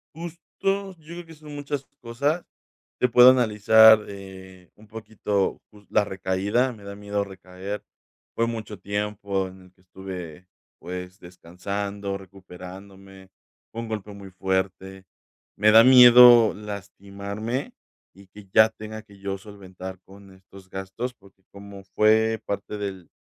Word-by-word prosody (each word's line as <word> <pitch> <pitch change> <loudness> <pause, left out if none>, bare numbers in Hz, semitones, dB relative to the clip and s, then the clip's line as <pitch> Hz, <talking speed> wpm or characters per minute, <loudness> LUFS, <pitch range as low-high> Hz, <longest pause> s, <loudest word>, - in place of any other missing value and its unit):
Justo, 170 +1 -8 0.2
yo 195 -1 -1
creo 170 +2 -10
que 165 - -13
son 150 -1 -12
muchas 145 -1 -5 0.2
cosas, 140 +8 -2 0.5
te 125 - +1
puedo 125 +2 +8
analizar, 110 -2 +6
eh, 95 -2 -12
un 105 +1 -19
poquito, 105 -2 -3
pues, 105 -1 -19
la 105 - +3
recaída, 100 +6 -1
me 110 -4 -14
da 100 0 -8
miedo 100 0 -3
recaer. 95 +1 -8 0.5
Fue 115 - +1
mucho 110 -3 -6
tiempo 100 -1 -3
en 95 0 -15
el 90 0 -21
que 90 - -30
estuve, 90 -2 -9 0.3
pues, 90 +1 -8
descansando, 100 +3 -6
recuperándome, 95 0 -13 0.4
fue 115 - -5
un 115 - -7
golpe 105 -2 -5
muy 100 -1 -11
fuerte. 95 0 -3 0.5
Me 105 +1 +5
da 110 +1 +8
miedo 125 -2 +8
lastimarme, 100 +3 -6 0.4
y 100 0 -17
que 100 +1 -15
ya 110 0 +7
tenga 110 0 -9
que 100 -2 -19
yo 100 0 -4
solventar 95 -2 -10
con 100 0 -16
estos 95 0 -17
gastos, 95 +7 -5
porque 95 -1 -23
como 100 0 -12
fue 110 +1 +3
parte 100 +1 -5
del 95 -4 -6
100 Hz, 140 wpm, -24 LUFS, 95-110 Hz, 0.5 s, puedo